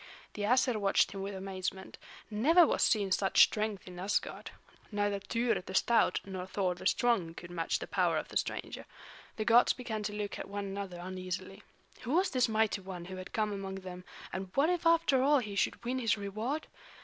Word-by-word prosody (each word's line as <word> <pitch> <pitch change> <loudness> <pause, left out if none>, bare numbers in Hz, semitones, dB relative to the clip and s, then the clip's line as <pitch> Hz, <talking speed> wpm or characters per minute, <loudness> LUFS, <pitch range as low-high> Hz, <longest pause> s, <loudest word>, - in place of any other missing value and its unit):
The 210 - -6
Æsir 245 +2 +3
watched 200 -2 +2
him 195 - -6
with 195 0 -4
amazement; 190 0 -5 0.3
never 315 +12 +5
was - - 0
seen 205 -4 +2
such 195 0 +5
strength 215 -3 -1
in 180 -1 -9
Asgard. 195 +3 -2 0.4
Neither 205 -1 0
Tŷr 230 -1 0
the 190 - -7
stout 230 -5 +3
nor 185 -2 -6
Thor 190 -1 0
the 175 - -3
strong 200 -9 +1
could 175 - -9
match 165 -2 -1
the - - -6
power - - +1
of - - -4
the - - -1
stranger. - - -4 0.5
The 215 - -3
gods 235 +2 +6
began 225 -4 -4
to 210 0 -3
look 205 -1 -4
at - - -6
one 200 0 -4
another 195 -2 -5
uneasily. 185 +1 -6 0.4
Who 245 - -4
was 370 +3 +3
this 255 -2 +2
mighty 220 -2 +1
one 185 -2 -7
who 185 +1 -7
had 185 - -8
come 215 -1 0
among 195 -1 -5
them, 185 -1 -8 0.3
and 190 0 -4
what 295 +5 +4
if 350 -2 0
after 330 -6 +4
all 290 +2 +5
he 215 -6 -3
should 215 - 0
win 255 +2 -1
his 225 -3 +1
reward? 215 +9 -3
205 Hz, 200 wpm, -32 LUFS, 190-235 Hz, 0.5 s, gods